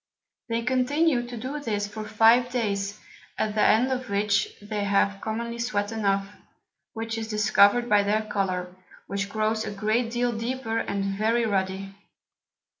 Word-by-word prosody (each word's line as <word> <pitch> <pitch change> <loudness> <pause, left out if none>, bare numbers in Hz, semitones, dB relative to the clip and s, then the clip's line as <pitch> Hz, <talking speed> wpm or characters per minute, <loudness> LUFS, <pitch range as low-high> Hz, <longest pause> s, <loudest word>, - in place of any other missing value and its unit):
They 230 0 -1
continue 260 +1 +1
to 240 0 -7
do 260 +6 -4
this 210 -7 -2
for 215 +1 -7
five 225 +3 +4
Days, 200 -4 -2 0.4
at 215 - -1
the 215 - +1
end 235 +5 +4
of 255 -1 -3
which 200 0 +1
they 205 0 -4
have 200 0 +1
commonly 235 +2 -4
sweat 210 -3 -1
enough, 200 -3 0 0.7
which 225 0 -4
is 220 - -4
discover'd 210 +2 +4
by 210 -3 +5
their 210 +2 +1
Colour, 185 -4 -2 0.3
which 200 0 -3
grows 220 +1 0
a - - -4
great 215 +4 0
deal 240 +1 0
deeper, 230 0 -2
and 200 -3 -2
very 220 +4 +1
ruddy. 195 -1 -2
215 Hz, 155 wpm, -26 LUFS, 200-235 Hz, 0.7 s, by